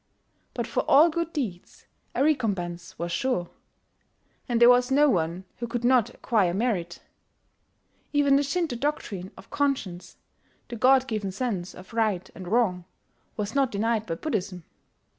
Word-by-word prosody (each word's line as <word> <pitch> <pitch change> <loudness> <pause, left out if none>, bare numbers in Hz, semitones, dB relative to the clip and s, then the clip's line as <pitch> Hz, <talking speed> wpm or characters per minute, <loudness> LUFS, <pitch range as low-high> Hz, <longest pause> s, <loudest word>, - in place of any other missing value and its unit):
But - - -2
for - - -2
all 310 +5 +7
good 335 0 -2
deeds 215 - -5 0.3
a - - +2
recompense 190 - -1
was 170 +1 -4
sure; 180 -6 -1 1.0
and 235 -1 +1
there 240 - +8
was 245 +1 +5
no 290 +2 +5
one 175 0 -1
who 235 - -4
could 240 +1 -3
not 245 -3 +4
acquire 205 -7 0
merit. 190 -7 -2 1.1
Even 285 -2 +4
the 280 - +4
Shinto 290 -1 -1
doctrine 235 -9 -3
of 190 - -15
conscience 265 -12 -2 0.5
the 240 - -5
god 260 +3 +4
given 215 -5 -2
sense 190 -5 -3
of 185 +4 -13
right 210 -5 0
and 185 - -9
wrong 185 -4 +1 0.5
was 210 0 -3
not 275 -3 +2
denied 220 +1 0
by 165 - -2
Buddhism. 190 - -3
225 Hz, 150 wpm, -26 LUFS, 185-265 Hz, 1.1 s, there